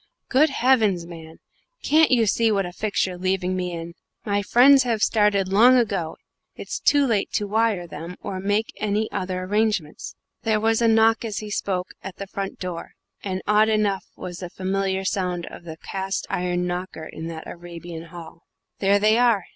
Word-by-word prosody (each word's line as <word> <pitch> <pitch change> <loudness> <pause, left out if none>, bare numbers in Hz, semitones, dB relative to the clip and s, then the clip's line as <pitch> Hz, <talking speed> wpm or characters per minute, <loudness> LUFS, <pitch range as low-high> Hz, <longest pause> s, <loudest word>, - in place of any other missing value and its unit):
"Good 295 +4 +4
heavens, 225 -10 +2
man, 165 -2 -11 0.5
can't 315 +1 +4
you 240 -3 +4
see 225 +2 +2
what 200 -2 +1
a 175 - -6
fix 210 +2 0
you're 180 -1 -6
leaving 185 0 0
me 180 -1 -2
in? 170 0 -6 0.3
My 205 -1 +1
friends 265 +6 +6
have 230 -4 0
started 210 -3 +2
long 235 +7 +6
ago 200 -9 -1 0.4
it's - - -5
too 285 -1 +3
late 220 -6 0
to 210 - 0
wire 215 -2 +1
to - - -10
them, 165 +3 -8
or 195 -2 -5
make 205 +3 -1
any 215 +1 -1
other 185 -1 -3
arrangements." 205 -5 -1 0.3
There 220 -2 +1
was 225 +1 +1
a 230 - +4
knock, 225 +1 +4
as 220 -3 -4
he 210 -1 -5
spoke, 185 -2 -2
at 190 -1 -7
the 200 - -6
front 195 0 -5
door; 180 -2 -6 0.3
and 190 -1 -3
odd 210 +1 +4
enough 210 -3 0
was 175 -1 -7
the 180 - -6
familiar 190 +1 -2
sound 180 -3 -1
of 170 - -11
the 160 -1 -8
cast 195 +2 -4
iron 180 0 -1
knocker 180 -2 -4
in 160 +1 -7
that 160 -1 -7
Arabian 170 -1 -9
hall. 165 -1 -11 0.4
"There 200 0 +4
they 215 +3 +3
are!" 230 -6 +3
195 Hz, 185 wpm, -23 LUFS, 180-220 Hz, 0.5 s, friends